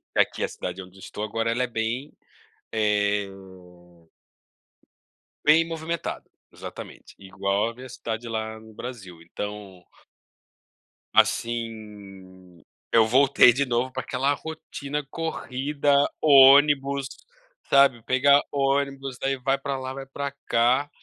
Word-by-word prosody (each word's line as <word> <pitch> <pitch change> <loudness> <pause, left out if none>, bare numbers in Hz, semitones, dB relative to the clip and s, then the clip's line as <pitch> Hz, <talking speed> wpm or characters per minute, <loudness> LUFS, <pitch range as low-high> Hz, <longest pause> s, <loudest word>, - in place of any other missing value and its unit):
Aqui - - +1
a - - +1
cidade 90 +1 -6
onde 90 0 -14
eu - - -15
estou 105 - -7
agora 115 +2 -1
ela 125 +2 0
é - - -1
bem, 120 +5 -3 0.6
eh 105 -2 +1 2.2
bem 160 +2 +5
movimentada, 165 +1 -5 0.2
exatamente, - - -11
igual 100 +2 -1
a - - -9
minha 130 +2 -10
cidade 115 -1 -5
lá 110 -1 -4
no 110 0 -15
Brasil. 100 -8 -9
Então 100 +1 -8 1.3
Assim, 100 -6 -2 0.3
eu 115 -1 +6
voltei 135 +1 +6
de 140 +4 0
novo 125 +1 -1
para 130 0 -5
aquela 135 +2 0
rotina 150 -2 -6
corrida, 145 -2 -1 0.3
ônibus, 140 -1 +6 0.6
sabe, 140 -4 +4
pegar 140 +3 +4
ônibus, 135 -1 -1
daí 135 0 0
vai 135 +1 0
para 140 0 -4
lá, 130 0 -5
vai 135 0 -7
para 140 +1 -5
cá. 125 +5 +2
125 Hz, 120 wpm, -25 LUFS, 105-140 Hz, 2.2 s, eu